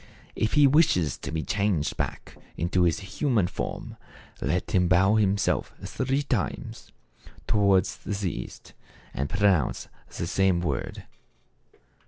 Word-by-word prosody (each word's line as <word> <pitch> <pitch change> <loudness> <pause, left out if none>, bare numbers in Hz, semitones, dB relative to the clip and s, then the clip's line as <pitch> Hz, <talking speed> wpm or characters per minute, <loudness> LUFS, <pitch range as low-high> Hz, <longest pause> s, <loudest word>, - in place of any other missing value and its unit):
If 110 - -1
he 145 0 +6
wishes 130 - +3
to - - -6
be 80 -1 -2
changed 100 -7 0
back - - -5 0.2
into 85 +2 0
his 85 +2 +1
human 110 - 0
form, - - -5 0.4
let 90 - -1
him 90 -2 +3
bow 95 +3 +4
himself 100 -2 +1
three 135 +2 -1
times 105 - -3 0.5
towards 100 -2 +2
the 100 -3 -3
east, - - -9 0.4
and 70 +2 -2
pronounce 100 - +1 0.2
the - - -4
same 95 +1 +2
word. 85 - -3
95 Hz, 125 wpm, -26 LUFS, 85-105 Hz, 0.5 s, he